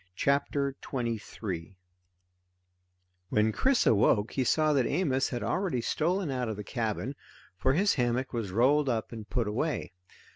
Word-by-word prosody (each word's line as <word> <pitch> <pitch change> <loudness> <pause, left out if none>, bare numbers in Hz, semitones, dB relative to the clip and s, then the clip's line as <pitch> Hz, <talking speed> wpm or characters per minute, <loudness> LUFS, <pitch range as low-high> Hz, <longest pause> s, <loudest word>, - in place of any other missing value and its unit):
CHAPTER 140 +2 +1
23 110 -7 -4 1.5
When 110 +1 +2
Chris 265 - +2
awoke 105 0 +3
he 130 - 0
saw 155 +4 +3
that 135 -4 +2
Amos 135 -8 +1
had 120 -3 -3
already 145 - 0
stolen 170 +6 0
out 125 -3 -2
of 110 - -3
the 105 - -6
cabin, 115 +3 -2 0.4
for 130 +8 +1
his 200 +7 +3
hammock 125 0 0
was 115 -5 -2
rolled 135 +7 +3
up 115 -3 -1
and 110 -2 -8
put 120 -4 0
away. 125 - -2
125 Hz, 145 wpm, -29 LUFS, 110-145 Hz, 1.5 s, awoke